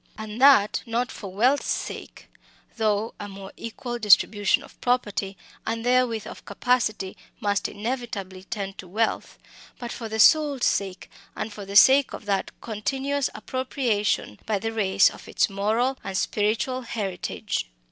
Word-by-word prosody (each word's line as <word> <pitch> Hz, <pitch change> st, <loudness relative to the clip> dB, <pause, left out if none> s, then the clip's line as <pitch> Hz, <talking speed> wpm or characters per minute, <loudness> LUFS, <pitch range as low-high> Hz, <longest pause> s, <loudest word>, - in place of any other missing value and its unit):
And 220 Hz, +2 st, -6 dB
that 265 Hz, -7 st, +6 dB
not 235 Hz, +2 st, -1 dB
for 195 Hz, -3 st, -8 dB
wealth's 250 Hz, +9 st, +2 dB
sake -, -, -5 dB, 0.5 s
though 215 Hz, 0 st, 0 dB
a 205 Hz, -, -5 dB
more 195 Hz, 0 st, -9 dB
equal 240 Hz, +1 st, -6 dB
distribution 205 Hz, -1 st, +4 dB
of -, -, -17 dB
property, 205 Hz, -6 st, 0 dB, 0.3 s
and 230 Hz, +1 st, -3 dB
therewith 245 Hz, -3 st, +2 dB
of -, -, -9 dB
capacity, 215 Hz, -3 st, 0 dB, 0.2 s
must 200 Hz, -1 st, 0 dB
inevitably 205 Hz, -5 st, -5 dB
tend 195 Hz, -2 st, -5 dB
to 185 Hz, -, -8 dB
wealth 220 Hz, +5 st, -1 dB, 0.4 s
but 240 Hz, -1 st, -6 dB
for 225 Hz, -2 st, -6 dB
the 220 Hz, -, -3 dB
soul's 290 Hz, +1 st, +5 dB
sake, 195 Hz, -2 st, -1 dB, 0.3 s
and 220 Hz, -, -4 dB
for 205 Hz, -1 st, -8 dB
the 200 Hz, +1 st, -7 dB
sake 265 Hz, +6 st, +7 dB
of -, -, -8 dB
that 200 Hz, -1 st, 0 dB
continuous 270 Hz, +6 st, -1 dB
appropriation 240 Hz, -, -1 dB
by 215 Hz, -, +1 dB
the 225 Hz, +3 st, -3 dB
race 195 Hz, -2 st, +4 dB
of -, -, -13 dB
its -, -, +1 dB
moral 225 Hz, +7 st, 0 dB
and 195 Hz, -1 st, -3 dB
spiritual 220 Hz, +7 st, 0 dB
heritage. 195 Hz, -, -3 dB
220 Hz, 145 wpm, -25 LUFS, 200-245 Hz, 0.5 s, sake